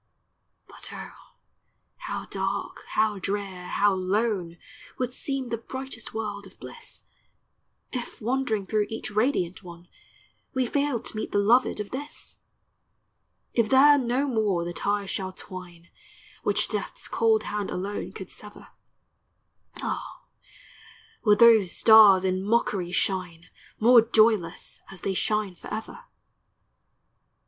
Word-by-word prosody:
But -, -, -7 dB
oh, -, -, -11 dB, 0.6 s
how -, -, -5 dB
dark, -, -, -4 dB
how 215 Hz, -2 st, +1 dB
drear, 195 Hz, -2 st, -4 dB
how 205 Hz, 0 st, +2 dB
lone, 190 Hz, -2 st, -1 dB, 0.4 s
Would 250 Hz, -1 st, -2 dB
seem 270 Hz, -2 st, -3 dB
the 230 Hz, -1 st, -2 dB
brightest 260 Hz, -1 st, -7 dB
world 205 Hz, -2 st, -5 dB
of 190 Hz, -, -20 dB
bliss, -, -, -9 dB, 0.9 s
If, 250 Hz, -1 st, -5 dB
wandering 240 Hz, -3 st, -1 dB
through 210 Hz, 0 st, 0 dB
each 225 Hz, -1 st, -5 dB
radiant 210 Hz, -5 st, 0 dB
one, 175 Hz, -1 st, -12 dB, 0.7 s
We 260 Hz, -1 st, +2 dB
failed 280 Hz, -2 st, -1 dB
to -, -, -4 dB
meet 215 Hz, -, -4 dB
the -, -, +1 dB
loved 225 Hz, +4 st, +3 dB
of 210 Hz, -, -5 dB
this! 290 Hz, +3 st, -6 dB, 1.1 s
If 230 Hz, -3 st, +2 dB
there 285 Hz, +2 st, +7 dB
no 255 Hz, +3 st, 0 dB
more 210 Hz, -8 st, 0 dB
the 175 Hz, -, -4 dB
ties 200 Hz, +1 st, -1 dB
shall 190 Hz, -1 st, -3 dB
twine 175 Hz, -2 st, -10 dB, 0.5 s
Which -, -, +1 dB
death's -, -, -4 dB
cold 445 Hz, -1 st, +2 dB
hand 205 Hz, -1 st, -3 dB
alone 200 Hz, +3 st, -4 dB
could 190 Hz, -, -9 dB
sever, 210 Hz, 0 st, -9 dB, 1.1 s
Ah, -, -, -5 dB, 1.0 s
would 210 Hz, -2 st, +5 dB
those 225 Hz, -6 st, +6 dB
stars 210 Hz, -4 st, +8 dB
in 185 Hz, 0 st, 0 dB
mockery 200 Hz, -4 st, 0 dB
shine, 180 Hz, -2 st, -1 dB, 0.3 s
More 235 Hz, +2 st, +7 dB
joyless, 215 Hz, -6 st, +2 dB
as 195 Hz, -, -10 dB
they 195 Hz, -, -1 dB
shine 210 Hz, -1 st, 0 dB
forever 220 Hz, -, -7 dB
210 Hz, 125 wpm, -26 LUFS, 190-235 Hz, 1.1 s, stars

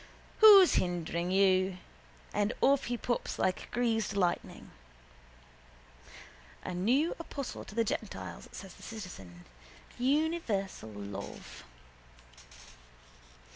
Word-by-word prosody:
Who's 405 Hz, -4 st, +9 dB
hindering 175 Hz, -1 st, -2 dB
you? 185 Hz, -1 st, +3 dB, 0.6 s
And 205 Hz, +2 st, +1 dB
off 280 Hz, 0 st, +3 dB
he 245 Hz, 0 st, -2 dB
pops 240 Hz, +1 st, -2 dB
like 185 Hz, -, -1 dB
greased 225 Hz, -4 st, 0 dB
lightning. 180 Hz, -3 st, -2 dB, 1.9 s
—A 180 Hz, -, -4 dB
new 250 Hz, -, +2 dB
apostle 280 Hz, -5 st, -6 dB
to 205 Hz, -, -12 dB
the 230 Hz, -, +3 dB
gentiles, -, -, -5 dB
says 195 Hz, -3 st, -9 dB
the -, -, -17 dB
citizen. 95 Hz, -, -9 dB, 0.5 s
Universal 255 Hz, -, 0 dB
love. 100 Hz, -, -8 dB
200 Hz, 95 wpm, -31 LUFS, 180-250 Hz, 1.9 s, Who's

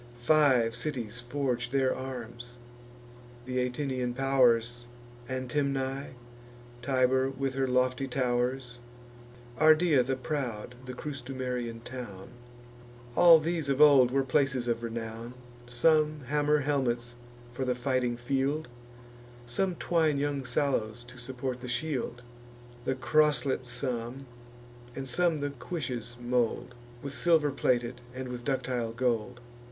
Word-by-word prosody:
Five 125 Hz, -3 st, +4 dB
cities 120 Hz, -5 st, -3 dB
forge 125 Hz, -1 st, -2 dB
their 130 Hz, 0 st, +2 dB
arms: 120 Hz, -2 st, -7 dB, 0.9 s
th' -, -, -12 dB
Atinian 125 Hz, 0 st, -1 dB
pow'rs, 120 Hz, -3 st, +2 dB, 0.4 s
Antemnae, 135 Hz, +1 st, -2 dB, 0.7 s
Tibur 130 Hz, 0 st, +2 dB
with 135 Hz, 0 st, -3 dB
her 135 Hz, 0 st, 0 dB
lofty 130 Hz, +1 st, +1 dB
tow'rs, 125 Hz, -1 st, -1 dB, 0.8 s
Ardea 155 Hz, -2 st, +5 dB
the 135 Hz, +2 st, -1 dB
proud, 125 Hz, -5 st, -4 dB
the 125 Hz, -, -6 dB
Crustumerian 125 Hz, -4 st, -4 dB
town: 120 Hz, -7 st, -8 dB, 0.9 s
All 170 Hz, -2 st, +9 dB
these 160 Hz, -2 st, -2 dB
of 135 Hz, 0 st, +1 dB
old 140 Hz, -4 st, +7 dB
were 135 Hz, +2 st, +1 dB
places 135 Hz, -2 st, +1 dB
of 115 Hz, -1 st, 0 dB
renown. 115 Hz, +1 st, -5 dB, 0.3 s
Some 155 Hz, +4 st, +2 dB
hammer 150 Hz, +2 st, +1 dB
helmets 120 Hz, -4 st, -1 dB, 0.4 s
for 125 Hz, +2 st, -3 dB
the 125 Hz, -1 st, 0 dB
fighting 125 Hz, -1 st, 0 dB
field; 135 Hz, +4 st, -1 dB, 0.8 s
Some 175 Hz, +10 st, -1 dB
twine 160 Hz, -4 st, +1 dB
young 140 Hz, -1 st, -1 dB
sallows 120 Hz, -3 st, -1 dB
to 125 Hz, +1 st, -13 dB
support 125 Hz, +1 st, -5 dB
the 125 Hz, -, -6 dB
shield; 120 Hz, -1 st, -3 dB, 0.6 s
The 130 Hz, -, 0 dB
croslet 130 Hz, 0 st, +2 dB
some, 125 Hz, +1 st, -3 dB, 0.7 s
and 135 Hz, 0 st, -5 dB
some 160 Hz, +4 st, +1 dB
the 145 Hz, 0 st, -1 dB
cuishes 125 Hz, -4 st, -5 dB
mould, 120 Hz, 0 st, 0 dB, 0.3 s
With 140 Hz, 0 st, -5 dB
silver 160 Hz, -3 st, +3 dB
plated, 120 Hz, -2 st, 0 dB
and 130 Hz, 0 st, -5 dB
with 120 Hz, -1 st, -6 dB
ductile 125 Hz, -4 st, -1 dB
gold. 120 Hz, 0 st, -1 dB
130 Hz, 115 wpm, -29 LUFS, 120-140 Hz, 0.9 s, All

